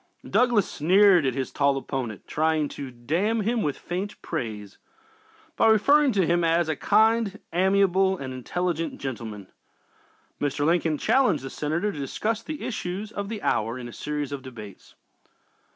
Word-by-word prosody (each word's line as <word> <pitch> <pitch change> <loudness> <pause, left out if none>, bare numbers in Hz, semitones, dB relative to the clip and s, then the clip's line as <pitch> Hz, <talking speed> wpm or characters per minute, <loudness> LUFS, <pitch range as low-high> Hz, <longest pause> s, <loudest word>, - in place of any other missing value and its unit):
Douglas 240 -6 +3
sneered 180 0 +4
at 130 - -1
his 135 -2 -3
tall 140 -1 +2
opponent, 130 -6 -4
trying 155 -1 +1
to 140 -2 -7
"damn 165 - -1
him 230 +2 0
with 145 -6 -1
faint 190 +4 -5
praise" 105 -4 -5 0.8
by 225 - +3
referring 280 +6 +5
to 195 -3 +2
him 175 +1 +2
as 165 0 +2
"a 160 - 0
kind, 220 +2 +2
amiable 190 +1 +3
and 130 -4 -6
intelligent 165 +6 -2
gentleman." 110 -6 -6 0.9
Mr. 145 0 -1
Lincoln 165 -1 +2
challenged 225 - +2
the 135 - -6
Senator 165 +7 -1
to 150 - -8
discuss 215 +11 -2
the 310 +4 -6
issues 205 -1 -4
of 200 -1 -5
the 220 -2 -5
hour 115 +3 0
in 125 -1 -7
a 120 - -10
series 150 -1 -4
of 140 -1 -4
debates. 110 -7 -11
165 Hz, 155 wpm, -25 LUFS, 135-205 Hz, 0.9 s, referring